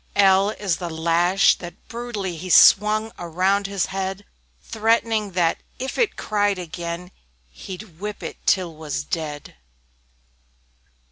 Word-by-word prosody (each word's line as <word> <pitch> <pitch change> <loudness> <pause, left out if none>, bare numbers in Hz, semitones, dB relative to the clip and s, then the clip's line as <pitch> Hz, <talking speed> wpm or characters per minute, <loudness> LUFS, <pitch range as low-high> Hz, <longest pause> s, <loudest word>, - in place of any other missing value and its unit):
L 195 0 +5
L 215 - -5
is 195 -5 -1
the 175 -2 -5
Lash, 170 +4 +3
that 175 -1 -11
brutally 230 -7 -4
He 180 +3 -7
swung 215 +4 +6
around 185 +4 0
its 195 -2 -1
head, 195 +1 -4 0.3
Threatening 220 - 0
that 170 -2 +1 0.2
"if 265 +1 -4
it 460 -4 +2
cried 205 -2 0
again, 170 +1 -6 0.4
He'd 180 - -10
whip 210 +1 -6
it - - -7
till 180 -3 +2
'twas 150 - -4
dead." 145 - -5
190 Hz, 130 wpm, -22 LUFS, 170-205 Hz, 0.4 s, swung